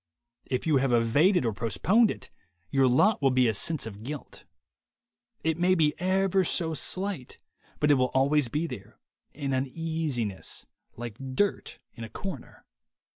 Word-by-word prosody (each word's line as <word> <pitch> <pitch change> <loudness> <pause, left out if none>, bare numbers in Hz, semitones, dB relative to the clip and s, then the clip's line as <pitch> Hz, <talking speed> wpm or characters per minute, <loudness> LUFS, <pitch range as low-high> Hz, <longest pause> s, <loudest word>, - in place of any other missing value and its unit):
If 125 - -2
you 155 -3 +3
have 135 -1 +1
evaded 130 - +3
or 115 - 0
postponed 120 - +2
it, - - -7 0.4
your 135 -1 +4
lot 190 - +3
will 135 - +4
be 130 -1 +3
a 110 - +1
sense 155 +8 +1
of 105 -2 -8
guilt. 145 +6 -8 1.0
It 160 0 0
may 185 +1 +3
be 155 -3 +3
ever 190 +1 +2
so 165 -1 +1
slight, 185 -3 -2 0.4
but 150 0 +3
it 140 - +4
will 125 0 +2
always 140 +1 +3
be 150 +8 -2
there, 110 - -9 0.4
an 140 -2 -3
uneasiness, 135 - -3 0.3
like 120 -2 -7 0.2
dirt 205 +7 -1 0.2
in 115 - -9
a 110 - -7
corner. 190 - -8
140 Hz, 155 wpm, -27 LUFS, 120-170 Hz, 1.0 s, your